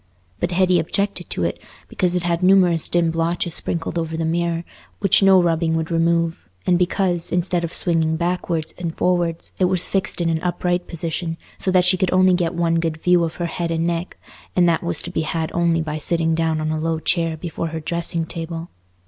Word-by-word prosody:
But 175 - 0
Hetty 180 -1 +3
objected 180 +2 -2
to 90 - -2
it 85 - -1 0.3
because 180 -1 0
it 180 - 0
had 170 0 0
numerous 180 -3 +4
dim 170 -1 +2
blotches 165 +1 -1
sprinkled 170 +1 -2
over 160 -1 -3
the 165 - -1
mirror, 170 +1 0 0.4
which 195 -1 +4
no 195 -1 +6
rubbing 165 -1 +1
would 160 +1 -2
remove, 165 - 0 0.2
and 180 -1 +3
because, 175 -1 0
instead 175 0 0
of 170 - -3
swinging 160 -3 +2
backwards 170 -1 -2
and 170 -2 -4
forwards, 175 -2 0
it 185 - +4
was 180 -1 +1
fixed 195 -1 -1
in 170 - 0
an 160 -1 0
upright 180 0 -1
position, 165 0 -4 0.2
so - - 0
that 185 -1 +4
she 185 +1 +4
could 185 0 +1
only 185 0 +5
get 175 -1 0
one 165 -1 +1
good 165 -1 -1
view 175 +1 +3
of 165 -1 -3
her 175 - -3
head 170 0 -3
and 165 0 0
neck, 170 +1 -2 0.4
and 180 -1 +4
that 165 -1 +2
was 170 -2 -1
to 175 - -3
be 160 - -1
had 160 0 -2
only 170 -1 +2
by 155 0 -4
sitting 165 +1 0
down 160 -1 0
on 155 0 -1
a 155 - -1
low 165 0 0
chair 165 0 0
before 165 0 -4
her 160 0 -4
dressing 170 +1 -2
table. 165 0 -6
170 Hz, 210 wpm, -21 LUFS, 165-180 Hz, 0.4 s, no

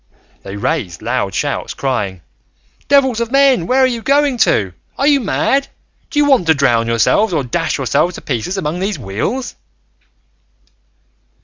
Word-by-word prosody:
They 95 0 -8
raised 100 - -3
loud - - -2
shouts, - - -2
crying, 100 -10 -3 0.6
"Devils 265 -4 +3
of 235 0 -3
men, 275 -10 +3
where 260 +1 +2
are - - +6
you 240 -3 -2
going 280 0 +2
to? 95 - +2 0.2
Are 275 - 0
you 290 -1 +4
mad? 270 +4 0 0.4
Do 315 - -6
you 295 - +4
want 265 - +3
to 160 - +5
drown 120 -5 +2
yourselves, 115 - +2
or 150 -4 0
dash 165 +7 -2
yourselves 140 +7 0
to - - -9
pieces 140 - -3
among 165 -1 -3
these 195 +2 -2
wheels?" 195 - -3
180 Hz, 155 wpm, -16 LUFS, -, 0.6 s, are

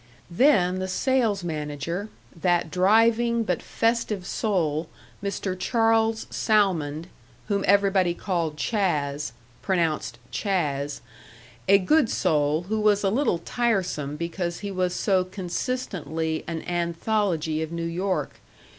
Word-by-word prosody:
Then 185 - +3
the 185 - -2
sales 225 -1 +1
manager, 155 +4 -4 0.3
that 175 -1 +1
driving 225 +5 +3
but 180 -5 -1
festive 225 -4 0
soul, 165 -7 -1 0.3
Mr. 195 -1 -2
Charles 225 +2 +2
Salmond, 170 -8 +1 0.4
whom 200 -1 +1
everybody 195 -3 +3
called 170 -6 -2
"Chas." 150 - -1 0.3
pronounced 170 -5 0
"Chaaz" 145 -8 -1 0.7
a 200 +1 +7
good 250 +7 +3
soul 155 -2 +1
who 215 +4 -2
was 210 -1 +3
a 195 - +2
little 255 -5 +2
tiresome 180 - -1
because 170 +2 -3
he 200 -1 -4
was 185 -1 -1
so 190 -3 +2
consistently 180 -4 -3
an 165 -1 -4
anthology 170 -2 -1
of 160 0 -4
New 170 0 -3
York. 185 +3 -2
185 Hz, 115 wpm, -25 LUFS, 165-210 Hz, 0.7 s, a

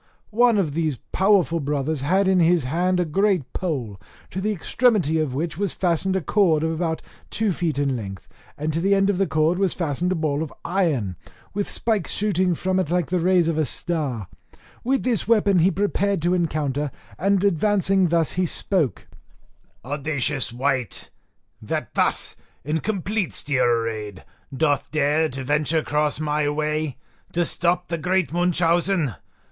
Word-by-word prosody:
One 235 0 +4
of 165 -8 0
these 155 -4 -1
powerful 190 -4 +3
brothers 145 0 -1
had 190 +7 +2
in 190 -1 +4
his 170 -2 +4
hand 180 +7 0
a 180 - +2
great 185 -2 0
pole, 125 - -3 0.3
to 190 - -3
the 210 +2 0
extremity 200 - +2
of 145 -5 -1
which 160 +4 -3
was 200 -2 -1
fastened 185 +1 +1
a 190 - +1
cord 165 -2 +2
of 160 - 0
about 160 0 -2 0.3
two 220 -2 0
feet 170 -4 -1
in 140 -2 +1
length, 100 -5 -7 0.3
and 155 +1 -2
to 165 - -1
the 200 +2 +3
end 195 +1 +3
of 190 - -3
the 195 - +2
cord 155 +4 +1
was 195 -3 +1
fastened 170 +1 -1
a - - +1
ball 155 -3 -1
of 160 - -4
iron, 150 - 0 0.4
with 205 0 -2
spikes 220 -6 -1
shooting 185 -4 +1
from 185 +3 0
it 185 - -1
like 175 0 0
the 180 - +2
rays 175 -1 +3
of 160 -1 0
a - - +3
star; 140 - -2 0.6
with 265 +2 +1
this 240 -6 0
weapon 205 -5 +4
he 170 +3 +5
prepared 200 +1 0
to 175 +1 +2
encounter, 150 -5 -1 0.3
and 195 +1 +2
advancing 195 0 +2
thus 165 -1 +2
he 185 0 0
spoke: 165 - -1 0.8
"Audacious 145 -1 -1
wight! 130 -2 -2 0.5
that - - -4
thus, - - +1 0.3
in 150 +4 -1
complete 200 0 -2
steel 135 -4 0
arrayed, 110 -4 -1 0.3
doth 145 0 0
dare 155 +1 +2
to 130 +1 -6
venture 150 +3 +1
cross 150 0 0
my 150 -1 0
way, 150 -2 -2 0.4
to 175 0 +1
stop 175 +1 0
the 170 -1 -2
great 180 0 0
Munchausen. 175 - +2
165 Hz, 170 wpm, -23 LUFS, 145-190 Hz, 0.8 s, he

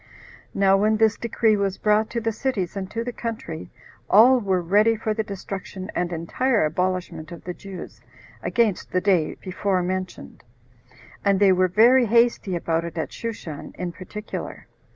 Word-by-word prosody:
Now 195 0 +4
when 215 +2 +2
this 220 -1 +3
decree 225 -1 +1
was 195 -2 -1
brought 215 +1 +2
to 235 - -2
the 225 0 -1
cities, 210 -6 -2
and 190 -1 -4
to 230 +2 -3
the 245 0 -5
country, 220 -10 -6 0.4
all 245 +5 +7
were 190 -4 0
ready 205 +6 +3
for 220 0 -2
the 220 - -1
destruction 195 -2 -7
and 175 0 -1
entire 190 +6 0
abolishment 175 -1 -2
of 170 - -9
the 180 - -5
Jews, 175 - -10 0.4
against 220 -2 0
the 185 - +2
day 180 -6 +2
before 185 0 -1
mentioned; 185 0 -5 0.8
and 200 -1 +3
they 200 -2 +6
were 185 0 +3
very 235 +7 +5
hasty 230 -4 +2
about 165 -1 -1
it 170 -1 -7
at 160 - -3
Shushan, 205 -10 -6
in 180 -1 -3
particular. 210 +5 -7
195 Hz, 165 wpm, -23 LUFS, 180-220 Hz, 0.8 s, all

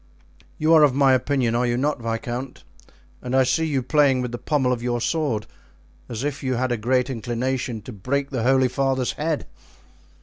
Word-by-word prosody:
You 155 +2 +3
are 160 - +7
of 145 -4 +4
my 135 -1 +5
opinion, 130 -2 +1
are 120 +1 +1
you 120 0 0
not, 145 0 -1
viscount? 120 +3 -4 0.6
and 125 +1 -3
I 130 - +5
see 160 +5 +1
you 135 -4 -1
playing 135 -1 +3
with 125 - -4
the 120 - -5
pommel 135 -4 +1
of 120 - -4
your 120 0 -1
sword, 130 -6 -1 0.6
as 120 +1 -4
if 145 -1 -3
you 130 -2 -1
had 130 +1 -1
a - - +2
great 125 +3 +1
inclination 120 -1 -3
to 125 - -9
break 140 +8 -2
the 130 -4 -2
holy 130 +2 +3
father's 130 -1 0
head." 155 0 -2
130 Hz, 195 wpm, -23 LUFS, 120-140 Hz, 0.6 s, are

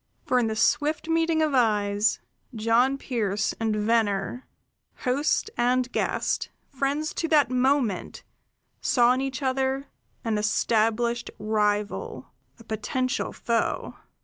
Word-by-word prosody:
For 250 0 +2
in 235 - +1
the 220 - -2
swift 295 +8 +1
meeting 325 -1 +2
of 305 -2 0
eyes, 210 -3 +2 0.4
John 230 +5 +2
Pearse 215 -6 -1
and 220 -1 0
Venner, 210 +1 0 0.5
host 285 +11 0
and 250 +1 +1
guest, - - -1 0.2
friends 280 +3 -1
to 330 - -2
that 295 -6 +3
moment, 255 -6 0 0.6
saw 245 -1 +4
in 260 - -1
each 270 +1 -3
other 265 +1 -1 0.4
an 220 -2 0
established 225 +2 +1
rival, 210 -1 -1 0.3
a 230 - -15
potential 255 +4 -2
foe. 230 -1 -1
240 Hz, 120 wpm, -26 LUFS, 220-270 Hz, 0.6 s, saw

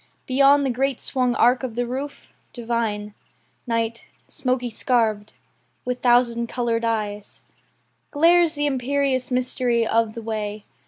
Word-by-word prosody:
Beyond 275 +2 +4
the 265 - +1
great 265 +1 -1
swung 250 -2 0
arc 245 +3 +3
o' - - 0
the 245 +1 -3
roof, 270 +4 -6 0.2
divine, 225 -3 -3 0.5
Night, 230 -1 -2 0.2
smoky 250 -2 -2
scarv'd, 220 -3 0 0.5
with 250 0 -3
thousand 240 -1 +3
coloured 235 -2 -1
eyes 210 -3 -3 0.7
Glares 335 +2 +4
the 290 0 -1
imperious 270 -1 0
mystery 250 -2 +1
of 225 -1 +1
the 230 - -7
way. 215 -1 -4
245 Hz, 125 wpm, -23 LUFS, 230-260 Hz, 0.7 s, Beyond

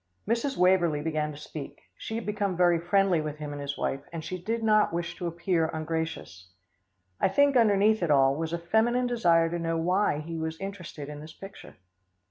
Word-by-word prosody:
Mrs. 235 +5 0
Waverlee 175 -5 +3
began 155 -1 -1
to 145 - -10
speak. 150 -1 -8 0.2
She 220 - -6
had 230 - -4
become 205 -3 -1
very 175 -2 +4
friendly 180 0 +2
with 150 -1 -5
him 150 -1 -6
and 145 - -6
his 140 0 -4
wife, 135 - -2
and 165 -2 -6
she 185 +1 -5
did 225 +4 -2
not 215 -1 +4
wish 170 +1 -3
to 175 - -3
appear 170 0 0
ungracious. 160 - -4 0.7
Then - - +3
I - - -8
think 285 +5 +4
underneath 215 -2 +4
it 170 - 0
all, 135 -2 +5
was 160 +1 -3
a 170 - -1
feminine 220 +8 +1
desire 170 -9 +3
to 175 - -2
know 165 0 -1
why 180 0 +1
he 165 +2 -5
was 160 0 -4
interested 185 -7 -7
in 150 0 -8
this 155 +1 -10
picture. 195 +3 -12
170 Hz, 205 wpm, -28 LUFS, 155-200 Hz, 0.7 s, all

